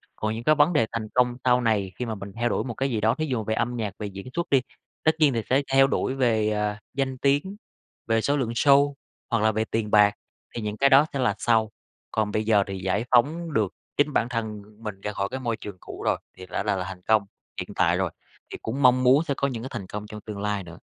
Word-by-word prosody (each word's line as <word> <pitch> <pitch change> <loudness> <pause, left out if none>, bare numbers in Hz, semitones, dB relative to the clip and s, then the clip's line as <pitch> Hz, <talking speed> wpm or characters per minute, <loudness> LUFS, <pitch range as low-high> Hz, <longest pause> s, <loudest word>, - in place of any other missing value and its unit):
Còn 110 0 -2
những 115 - -6
cái 155 +3 +4
vấn 150 +4 +4
đề 115 - +3
thành 115 -2 -3
công 125 -1 +3
sau 125 0 +4
này 105 -5 +1
khi 125 - -3
mà 110 -1 -3
mình 100 0 -8
theo 120 0 +2
đuổi - - 0
một 120 -3 -4
cái 135 +4 -1
gì 110 -3 -1
đó 110 +3 +3
thí 155 - -2
dụ 125 -7 -2
về 110 - -1
âm 120 +2 -1
nhạc, 105 -5 -3
về 105 - -3
diễn 100 +4 -9
xuất 170 0 -2
đi, 135 -2 +4 0.4
tất 160 - +5
nhiên 145 -4 +5
thì 115 - 0
sẽ 135 +2 +4
theo 135 0 +6
đuổi 130 - 0
về, 110 -5 +2
ờ, 105 0 -1 0.2
danh 135 -1 -1
tiếng, 145 +9 +1 0.5
về 115 0 +2
số 145 +4 +1
lượng 125 -4 -1
show 140 +3 +4 0.4
hoặc 115 -3 +1
là 110 - +4
về 110 +1 -1
tiền 110 -2 -1
bạc, 105 -1 +6 0.4
thì 115 - -3
những 105 0 -4
cái 140 0 +4
đó 140 +3 +7
sẽ 140 - -2
là 125 -6 +2
sau. 110 -2 +2 0.4
Còn 110 -1 0
bây 110 +1 0
giờ 105 -2 +4
thì 95 -1 -4
giải 95 +5 -1
phóng 155 +7 +2
được 105 -6 +1 0.3
chính 145 0 +2
bản 120 -1 +1
thân 110 -3 -3 0.2
mình 100 -2 -6
ra 105 - -3
khỏi 100 -1 -1
cái 130 - -3
môi 115 -3 -2
trường 100 -3 -8
cũ - - -9
rồi - - +2 0.2
thì 95 - -9
đã - - -3
là 105 -1 +1
là 95 - -2
thành 90 -1 -8
công 110 +1 +3 0.4
hiện - - -7
tại - - +3
rồi, - - -1 0.4
thì - - -5
cũng 130 +6 -3
mong 130 0 +5
muốn 135 +5 +5
sẽ 145 - -1
có 140 - +1
những 120 -4 -5
cái 130 - -5
thành 100 -6 -6
công 105 0 -6
trong 105 -1 -9
tương 105 -2 -7
lai 105 -1 -1
nữa. 85 -1 -11
115 Hz, 270 wpm, -25 LUFS, 105-135 Hz, 0.5 s, đó